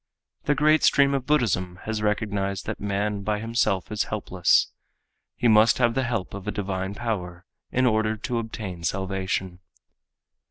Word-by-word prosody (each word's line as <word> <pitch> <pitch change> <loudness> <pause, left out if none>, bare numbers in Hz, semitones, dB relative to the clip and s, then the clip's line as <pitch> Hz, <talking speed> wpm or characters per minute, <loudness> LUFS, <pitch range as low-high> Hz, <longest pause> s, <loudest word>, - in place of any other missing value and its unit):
The 145 - +2
great 155 +2 +4
stream 140 0 +4
of 135 -2 -2
Buddhism 105 -11 +1
has 110 -1 -3
recognized 100 -2 -1
that - - -4
man 100 0 -1
by 105 +1 -1
himself 110 -4 -1
is 105 -3 0
helpless. - - +1 0.6
He 120 - +1
must 110 0 +5
have 120 -2 +2
the 135 - 0
help 115 -7 -3
of 100 -1 -8
a - - 0
divine 95 -1 -3
power 90 -7 -4 0.3
in 130 +1 +2
order 110 -2 +1
to 120 +2 -2
obtain 105 -6 -6
salvation. 95 -1 -2
105 Hz, 155 wpm, -25 LUFS, 95-120 Hz, 0.6 s, must